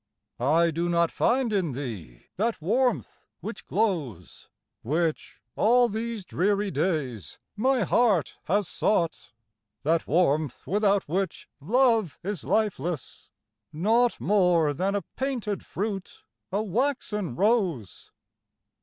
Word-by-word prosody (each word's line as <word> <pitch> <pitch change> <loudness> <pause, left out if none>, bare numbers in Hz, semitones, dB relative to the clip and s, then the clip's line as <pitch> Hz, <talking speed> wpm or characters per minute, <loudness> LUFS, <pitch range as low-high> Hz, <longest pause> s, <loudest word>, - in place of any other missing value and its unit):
I 160 +7 +3
do 170 +2 -1
not 170 -1 +2
find 245 -2 +1
in 180 -8 0
thee 110 - -7
that 225 +5 -1
warmth 240 +10 -1
which - - -7
glows, 150 - -2 0.3
Which, 160 +5 -2 0.2
all 245 +3 +4
these 225 -1 -4
dreary 200 +3 0
days, 130 - -2 0.2
my 255 +2 +2
heart 190 - +2
has 200 +2 +1
sought, 170 - 0 0.5
That 165 +2 +1
warmth 155 -4 +1
without 200 0 +2
which 185 +3 -2
love 225 - +2
is 195 -5 -3
lifeless, 180 - -2 0.4
naught 225 +9 +2
More 180 -7 +3
than 190 +7 -1
a 200 - -1
painted 240 -7 -3
fruit, 195 -1 -5 0.3
a 205 +3 0
waxen 210 - -1
rose. 190 - 0
190 Hz, 110 wpm, -26 LUFS, 160-220 Hz, 0.5 s, all